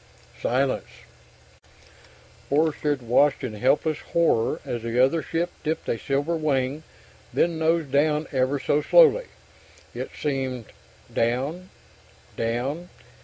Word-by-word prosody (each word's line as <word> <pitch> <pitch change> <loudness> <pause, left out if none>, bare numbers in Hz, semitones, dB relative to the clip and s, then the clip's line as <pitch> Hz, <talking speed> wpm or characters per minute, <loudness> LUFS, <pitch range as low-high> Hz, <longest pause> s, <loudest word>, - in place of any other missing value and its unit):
Silence. 130 +2 0 1.6
Forster 150 +1 +1
had 140 -4 -1
watched 135 +5 +3
in 125 -4 -3
helpless 140 +7 +1
horror 165 -9 +1
as 120 - -3
the 115 +1 -2
other 135 +6 +4
ship 165 +4 -2
dipped 160 +1 -2
a 115 - -1
silver 145 +5 -1
wing, 145 -2 0 0.5
then 170 -1 +1
nosed 160 -3 +1
down 150 +2 +2
ever 135 +1 +1
so 145 +2 +1
slowly, - - +5 0.7
it - - -5
seemed... 130 -5 -2 0.5
down... 135 +12 -1 0.7
down 130 +10 -2
145 Hz, 115 wpm, -25 LUFS, 130-160 Hz, 1.6 s, slowly